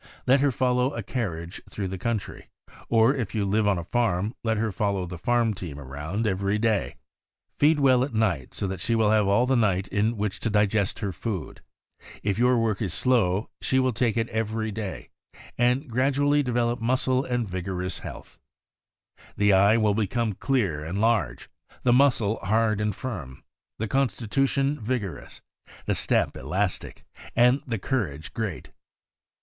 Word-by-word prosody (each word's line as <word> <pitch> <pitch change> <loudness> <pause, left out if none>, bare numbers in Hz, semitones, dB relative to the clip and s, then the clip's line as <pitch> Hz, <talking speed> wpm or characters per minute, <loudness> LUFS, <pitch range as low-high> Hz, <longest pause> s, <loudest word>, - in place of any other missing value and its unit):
Let 135 +2 +5
her 140 0 +3
follow 125 +1 +1
a 115 - -4
carriage 90 -7 -4
through 100 -3 -4
the 95 0 -5
country, 115 0 -4 0.4
or 115 +3 +4
if 115 -6 -4
you 105 -2 +1
live 105 +2 +1
on 100 -2 +2
a 85 - -3
farm, 105 0 0
let 110 -1 0
her 110 0 0
fol 100 +2 0
low 95 -2 -2
the 90 -1 -8
farm 120 +1 +2
team 85 -7 -7
around 75 - -4
every 100 0 0
day. 110 -2 0 0.6
Feed 150 +1 +4
well 130 -3 +4
at 135 - -3
night, 100 - -1
so - - -2
that 95 -2 -3
she 115 +5 0
will 110 -2 +3
have 105 -2 +3
all 100 +5 +3
the 130 +1 +2
night 100 -5 +1
in 110 +3 0
which 105 -1 -2
to 115 - -1
digest 105 -1 +1
her 100 -2 -1
food. 90 - -5 0.6
If 100 +1 0
your 125 0 +4
work 115 -3 0
is 90 -6 -1
slow, 110 -4 +1
she 130 - +1
will 130 -1 +2
take 115 -1 0
it 115 0 +1
every 110 0 -2
day, 100 -3 -6 0.4
and 125 +4 +1
gradually 140 +4 +2
develop 120 -2 0
muscle 130 +2 +1
and 120 -4 -1
vigorous 90 -1 -3
health. - - -10 1.0
The 105 -1 +4
eye 100 +4 +5
will 105 -2 +2
become 110 +1 0
clear 95 - -1
and 85 +6 -3
large, 105 - +1 0.4
the 120 - +4
muscle 120 -5 +3
hard 110 0 +1
and 105 -1 -1
firm, 80 - -6 0.3
the 110 - -2
constitution 135 +3 0
vigorous, 110 -5 -4 0.4
the - - +1
step - - +2
elastic, 95 0 -3 0.3
and 125 +3 +4
the 115 -2 -1
courage 95 - -3
great. 110 -7 -4
110 Hz, 170 wpm, -26 LUFS, 95-120 Hz, 1.0 s, Let